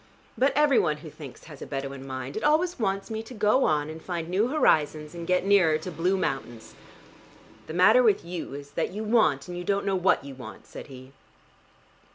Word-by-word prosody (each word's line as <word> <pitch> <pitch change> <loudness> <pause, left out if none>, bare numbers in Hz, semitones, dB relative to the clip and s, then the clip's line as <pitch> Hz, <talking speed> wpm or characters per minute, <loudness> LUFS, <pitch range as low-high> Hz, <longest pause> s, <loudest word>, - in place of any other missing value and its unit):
"But 260 +5 +3
every 295 -2 +4
one 150 -2 +1
who 155 - -8
thinks 140 -6 -11
has 150 -4 -12
a - - -7
Bedouin 135 -1 -5
mind: 130 0 -6
it 215 - -4
always 320 +2 +2
wants 195 0 -2
me 220 0 -3
to 235 +3 -11
go 215 +5 +3
on 150 -1 +1
and 160 +1 -8
find 170 -2 -4
new 200 +6 +2
horizons 155 - +1
and 170 -1 -7
get 180 0 +1
nearer 185 -6 +4
to 170 +4 -7
blue 175 +4 0
mountains." 135 -8 -4 0.9
"The 160 - -6
matter 215 +8 +6
with 215 -7 +2
you 170 -5 -6
is 145 0 -9
that 165 - -1
you 210 +3 -5
want 210 - +2
and 175 - -6
you 175 - -5
don't 200 +2 0
know 195 -1 +1
what 185 -6 +2
you 140 - -8
want," 115 -6 -11
said - - -10
he. 130 -1 -12
175 Hz, 210 wpm, -26 LUFS, 145-210 Hz, 0.9 s, matter